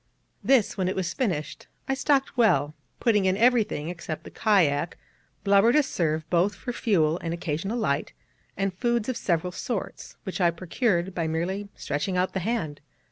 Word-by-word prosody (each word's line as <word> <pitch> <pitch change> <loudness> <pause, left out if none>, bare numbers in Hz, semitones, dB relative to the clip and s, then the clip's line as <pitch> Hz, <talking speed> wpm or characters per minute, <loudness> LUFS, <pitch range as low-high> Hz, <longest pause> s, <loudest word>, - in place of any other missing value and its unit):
This, 255 -7 +3
when 185 - +1
it 185 - -1
was 180 -3 -2
finished, 170 - -2 0.2
I 270 - +1
stocked 275 0 +1
well, 150 - +3 0.3
putting 210 -5 +3
in 190 0 +2
everything, 220 -9 +2
except 170 -3 -6
the - - -11
kayak, 170 -7 +2 0.5
blubber 200 +3 +5
to 300 - +5
serve 160 - -1
both 180 +4 +2
for 245 - -5
fuel 170 -9 +2
and 165 0 -3
occasional 175 +7 -3
light, 150 -10 -1 0.4
and 195 -1 0
foods 235 +4 0
of 255 - -1
several 175 -2 0
sorts, 205 +2 -5
which 190 0 -4
I 175 - +5
procured 180 +2 -1
by 170 -3 -1
merely 185 +6 -2
stretching 150 +6 -2
out 185 +1 0
the 190 - -1
hand. 175 -8 -2
185 Hz, 170 wpm, -26 LUFS, 165-220 Hz, 0.5 s, blubber